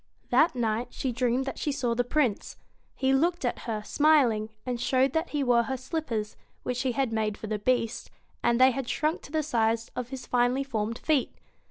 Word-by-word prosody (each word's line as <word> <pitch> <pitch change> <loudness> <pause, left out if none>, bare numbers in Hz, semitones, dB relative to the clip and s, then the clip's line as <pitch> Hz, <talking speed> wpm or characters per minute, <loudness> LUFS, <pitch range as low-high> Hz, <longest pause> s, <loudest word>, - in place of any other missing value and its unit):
That 315 -3 +4
night 230 0 0
she 260 - -3
dreamed 245 +2 0
that 270 - -5
she 295 - -1
saw 250 -4 -1
the 245 +1 +1
Prince. 245 -4 0 0.4
He 265 0 +1
looked 335 +2 +1
at 245 - -1
her, 215 -2 -2
smiling, 265 -8 +3 0.2
and 245 -2 -3
showed 260 +1 +2
that 320 +2 0
he 290 -2 -1
wore 245 -2 +4
her 265 +2 -3
slippers 250 -6 -3 0.3
which 250 - -2
she 255 0 0
had 265 -3 0
made 215 -2 -1
for - - -7
the 215 0 -2
Beast 235 0 0 0.3
and 235 0 +2
they 260 +1 +7
had 260 -1 -4
shrunk 310 +3 0
to - - -13
the 310 0 0
size 230 -5 0
of 250 -1 -4
his 265 -1 -7
finely 245 +2 +2
formed 230 -4 -2
feet. 300 -5 0
250 Hz, 205 wpm, -28 LUFS, 230-275 Hz, 0.4 s, they